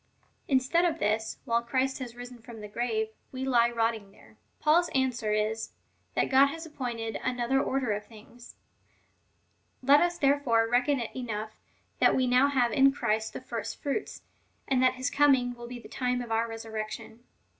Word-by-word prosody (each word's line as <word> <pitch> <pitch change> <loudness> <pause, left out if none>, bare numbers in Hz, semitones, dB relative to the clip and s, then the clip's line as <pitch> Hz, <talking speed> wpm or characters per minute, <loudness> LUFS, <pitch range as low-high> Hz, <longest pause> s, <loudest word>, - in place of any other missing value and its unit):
Instead 270 +6 +2
of 335 -3 +1
this, 220 -4 -1
while 235 0 +1
Christ 260 +3 -1
has 245 -2 -7
risen 245 0 -9
from 230 -1 -11
the 210 - -7
grave, 220 0 -1 0.2
we 260 0 -4
lie 240 -3 +4
rotting 225 -3 -1
there." - - -20 0.2
Paul's 335 +3 +3
answer 250 -5 0
is, 215 +1 -1 0.4
that - - +1
God 270 +1 +7
has 325 +3 -6
appointed 240 -7 -4
another 255 +1 0
order 260 -5 -1
of 205 0 -3
things. 230 +2 -15 1.3
Let 280 +3 +6
us 350 0 +1
there 280 -2 +3
fore 230 -5 +2
reckon 250 +4 +2
it 235 - -5
enough, 220 -4 -4 0.5
that - - +5
we 260 - +2
now 250 +2 +4
have 255 -4 +2
in 270 +4 +5
Christ 220 -5 -1
the - - -6
first - - -5
fruits,^ 290 +8 -4 0.4
and 260 -2 +2
that 255 0 +4
his 255 +2 -2
coming^ 265 -4 +3
will 240 0 -9
be 245 0 -7
the 240 - -12
time 250 -1 -1
of 235 - -9
our 225 +1 +1
resur 225 0 -8
rection. 215 +1 -6
245 Hz, 180 wpm, -28 LUFS, 225-270 Hz, 1.3 s, God